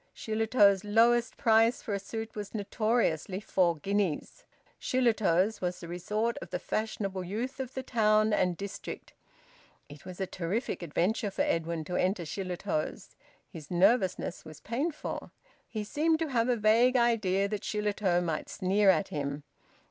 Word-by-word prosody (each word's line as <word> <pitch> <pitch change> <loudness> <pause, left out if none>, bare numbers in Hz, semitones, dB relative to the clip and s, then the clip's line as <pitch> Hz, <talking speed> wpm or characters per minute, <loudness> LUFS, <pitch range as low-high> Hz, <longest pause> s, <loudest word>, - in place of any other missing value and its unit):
Shillitoe's 215 -3 +3
lowest 230 +3 +3
price 225 +1 +3
for 210 - -3
a 200 - -1
suit 220 +3 -6
was 210 +1 -7
notoriously 205 -4 0
four 180 -5 +1
guineas. 195 -1 -2 0.3
Shillitoe's 220 -5 +2
was 180 -1 -2
the 170 - -8
resort 210 +7 -2
of - - -9
the - - -2
fashionable 200 -3 -3
youth 225 +9 -4
of 260 -1 -5
the 260 - -3
town 215 -3 +3
and 180 -4 +1
district. 200 0 -7 0.8
It 145 0 -12
was 180 -1 -9
a 190 - 0
terrific 190 +7 -3
adventure 180 +7 0
for 195 - -1
Edwin 165 -1 -1
to 180 - -3
enter 185 -1 +1
Shillitoe's. 180 -1 -3 0.4
His 155 -3 -11
nervousness 185 0 +2
was 155 -2 -11
painful. 285 +8 -3 0.4
He 215 -2 -4
seemed 315 +9 +1
to 320 -1 -2
have 235 -2 +1
a 245 - +3
vague 230 +4 +4
idea 210 -5 +2
that 210 -1 -3
Shillitoe 205 -4 0
might 160 -3 -3
sneer 195 +2 +2
at 165 -5 +3
him. 140 -1 -4
205 Hz, 150 wpm, -30 LUFS, 180-225 Hz, 0.8 s, vague